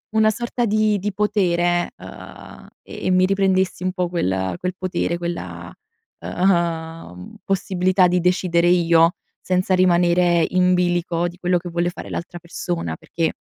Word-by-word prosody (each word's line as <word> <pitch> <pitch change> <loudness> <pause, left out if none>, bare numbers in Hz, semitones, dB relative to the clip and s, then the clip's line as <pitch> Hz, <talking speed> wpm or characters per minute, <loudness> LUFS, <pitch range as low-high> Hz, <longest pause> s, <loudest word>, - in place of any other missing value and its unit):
una 220 0 +4
sorta 240 +2 -2
di 215 -1 +2
di 205 +2 -2
potere, 175 -4 +1
uhm, - - -12 0.2
e - - -9
e - - +2
mi 185 0 +4
riprendessi 190 -1 +1
un 185 0 -1
po' 180 -2 -2
quel 95 - -1
quel 180 0 -3
potere 180 -2 -2
quella, 175 0 -6 0.5
uhm, 165 - -2
possibilità 185 -1 +1
di 180 +1 +1
decidere 180 -1 +1
io, 170 -1 +4 0.3
senza 185 +1 0
rimanere 175 -1 +3
in 180 0 +3
bilico 175 -1 0
di 175 +1 -9
quello 180 0 +1
che 175 +1 -6
vuole 170 +1 -1
fare 180 - -9
l'altra 175 +1 -6
persona 170 - -4
perché, 165 - -3
180 Hz, 145 wpm, -21 LUFS, 170-185 Hz, 0.5 s, una